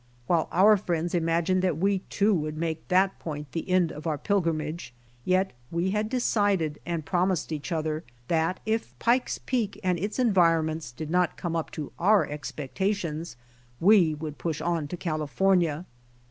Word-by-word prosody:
While 165 +1 +2
our 205 +4 +6
friends 175 -3 -2
imagined 170 +2 +1
that 180 -5 +1
we, 195 +3 +2
too, 205 +3 +1
would 155 -3 -2
make 160 -1 -3
that 190 +1 +2
iioint 150 -2 -5
the 165 - -4
end 180 -3 +3
of 155 +3 -7
our 155 -2 0
pilgrimage, 165 -6 -1 0.3
yet 185 -1 +2 0.2
we 170 +3 0
had 210 +1 -1
decided 205 - +1
and 170 -3 -2
promised 180 -1 0
each 155 +2 -4
other 155 -1 -1 0.2
that 165 +2 +1
if 220 - -2
Pike's 245 - +1
Peak 230 -6 -2
and 180 -2 +1
its 205 +4 -3
enviponments 165 - +2
did 155 +6 -6
not 180 -1 +1
come 170 -2 -3
up 165 - -2
to 150 -3 -5
our 200 -1 +4
expectations 155 - -3 0.4
we 180 -4 +5
would 150 -1 -7
push 160 -3 -2
on 165 -2 -1
to 180 - -6
California. 165 +1 +1
170 Hz, 160 wpm, -27 LUFS, 155-190 Hz, 0.4 s, our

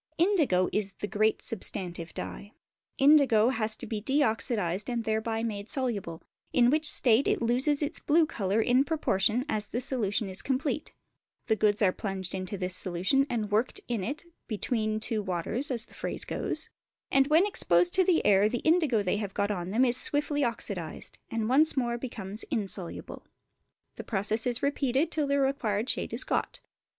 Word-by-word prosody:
Indigo 315 - +2
is 200 -2 -1
the 205 - -5
great 215 +1 +1
substantive 180 -5 -4
dye: 205 +1 -6 0.4
the 270 - -1
indigo 270 -6 +5
has 220 -4 0
to - - -6
be 215 -3 -4
de 275 +7 +2
oxidised 210 -4 -1
and 240 -2 -2
thereby 220 +1 -1
made 205 -2 -4
soluble, 205 - -2 0.3
in 245 0 +4
which 305 0 +4
state 245 -1 +3
it - - +1
loses 260 +6 +1
its 300 +3 -1
blue 315 +2 +3
colour 210 - -1
in 250 +4 +3
proportion 250 -6 0
as 215 -7 -2
the 235 - -3
solution 225 -5 -1
is 190 0 -3
complete; 280 +3 -2 0.5
the 220 - +2
goods 210 0 +2
are 185 - +4
plunged 190 -2 -5
into 190 +2 -4
this 185 0 -2
solution 190 +11 +1
and 215 -4 -2
worked 220 +4 0
in 230 -5 -2
it 290 - -4 0.2
"between 215 0 -1
two 220 -1 -2
waters," 195 +8 -2
as 235 -3 -1
the - - -21
phrase - - -4
goes, - - -4 0.4
and 270 0 +4
when 320 +5 +4
exposed 175 - +2
to 375 - +4
the 355 -2 +2
air 205 +1 +5
the 240 +1 -3
indigo 315 - +3
they 185 +1 0
have 205 -2 -5
got 200 +1 0
on 180 -3 -4
them 235 +6 +3
is 245 0 +3
swiftly 290 +1 +1
oxidised, 200 -8 -3
and 225 -1 -2
once 285 +5 +4
more 240 -2 0
becomes 215 -5 -6
insoluble. 200 - -5 0.7
This - - -8
process 215 +2 +1
is 240 -1 +1
repeated 280 +1 0
till 300 -2 0
the 280 0 +1
required 250 -6 0
shade - - -4
is - - -1
got. - - -2
225 Hz, 180 wpm, -28 LUFS, 205-270 Hz, 0.7 s, indigo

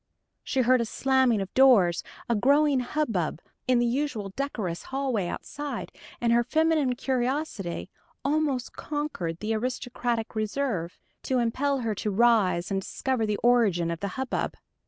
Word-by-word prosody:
She 265 - 0
heard 255 0 +4
a - - 0
slamming 260 -2 +2
of 195 - -6
doors, 220 -11 +5 0.3
a 235 - +2
growing 280 +5 +4
hubbub 235 - -1 0.3
in 255 -1 +4
the 240 - +3
usually 240 -5 -1
decorous 220 -11 -3
hallway 265 -8 -1
outside, 285 +5 -5 0.3
and 235 -1 +2
her 240 0 +4
feminine 310 -1 +2
curiosity 250 - -2 0.4
almost 285 -3 0
conquered 290 - -4
the 215 +1 -1
aristocratic 240 0 -2
reserve, 215 -5 -2 0.2
to 260 - 0
impel 260 +3 0
her 225 -2 -1
to 210 - -3
rise 205 -5 +3
and 195 0 0
discover 245 +2 -1
the 210 -1 0
origin 205 -9 +3
of 165 - -4
the 200 - -2
hubbub. 265 -1 -2
240 Hz, 145 wpm, -27 LUFS, 210-270 Hz, 0.4 s, doors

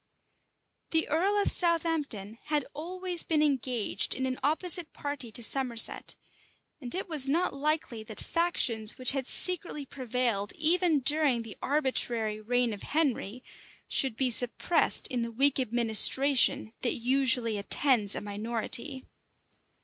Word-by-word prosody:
The 320 -1 +1
earl 380 +7 0
of 405 - 0
Southampton 315 - +1
had 295 -3 -2
always 355 +3 -4
been 310 -2 0
engaged 250 -8 0
in 260 - -3
an 255 0 -4
opposite 325 +4 +1
party 285 -5 -7
to 235 - -3
Somerset; 245 -2 +1 0.7
and 245 +2 -5
it 380 - -5
was 295 -5 +1
not 335 +6 -1
likely 280 -5 -3
that 215 -1 -11
factions 240 -11 -2
which 255 -1 +5
had 270 -2 -4
secretly 345 -5 +1
prevailed 250 -6 -3
even 330 -1 +1
during 275 -3 +3
the 225 -2 -10
arbitrary 240 -6 -1
reign 245 +1 -1
of 205 - -10
Henry, 255 -6 -3 0.4
should 265 -5 0
be 255 +1 0
suppressed 245 +8 +2
in 250 -3 -3
the 230 0 -5
weak 275 +4 +2
administration 240 +1 +3
that 240 - -1
usually 245 -3 +1
attends 215 -1 +1
a - - -4
minority. 230 +6 -2
260 Hz, 135 wpm, -27 LUFS, 230-305 Hz, 0.7 s, which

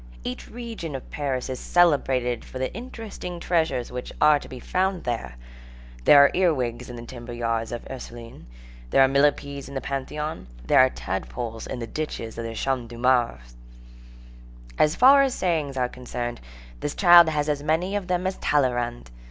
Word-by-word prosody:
Each 125 - -6
region 225 - -6
of 130 - -8
Paris 135 -4 -2
is 130 -1 -5
celebrated 135 -8 +2
for - - -9
the 130 0 -3
interesting 220 -7 -7
treasures 165 -8 0
which 125 0 -6
are 150 -1 +5
to - - -12
be 130 - -8
found 185 +5 -1
there. 115 - -3 0.7
There 145 - +8
are 140 - +5
ear 180 -1 +3
wigs 125 -1 -3
in 120 - -7
the 120 0 -8
timber 120 -1 -9
yards 115 -1 -2
of 120 - -5
the - - -8
Ursulines, 120 -2 -10 0.4
there 135 - +5
are - - +6
millepeds 140 0 +1
in 140 - -9
the - - 0
Pantheon, 140 - -4 0.2
there - - +4
are 130 0 +7
tadpoles 115 +2 -5
in - - -5
the 120 - -4
ditches 115 -4 -5
of 115 - -4
the 115 0 -5
Champs 125 -1 -2
de 120 - -9
Mars. 115 - +1 1.2
As 155 +1 +4
far 275 +3 +7
as 270 -2 +1
sayings 155 -7 -1
are 125 -1 +1
concerned, 120 -1 -6 0.4
this 145 - -4
child 175 -3 +8
has 150 -1 -1
as 145 -1 -1
many 165 +6 0
of 200 -3 -3
them 180 0 -1
as 190 0 -1
Talleyrand. 120 - 0
135 Hz, 185 wpm, -25 LUFS, 120-160 Hz, 1.2 s, There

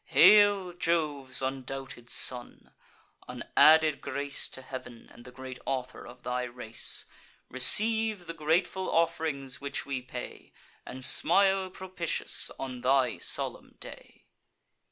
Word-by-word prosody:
Hail, 205 -3 +5
Jove's 150 -7 0
undoubted 130 -2 -6
son! 125 -1 -2 0.6
an - - -7
added 155 -2 +6
grace 140 0 -3
To 130 - -9
heav'n 125 -3 -9
and 120 - -16
the 125 - -11
great 130 0 -9
author 130 -2 -4
of 120 +1 -14
thy 125 0 -2
race! 120 -2 -2 0.4
Receive 215 - +3
the 165 - -6
grateful 170 +4 0
off'rings 160 -6 -1
which 140 0 -4
we 135 -2 -4
pay, 125 - -9 0.3
And 130 0 -6
smile 195 +6 +3
propitious 185 -2 -4
on 130 -2 -6
thy 130 0 +2
solemn - - -2
day!" - - -12
140 Hz, 120 wpm, -29 LUFS, 130-170 Hz, 0.6 s, added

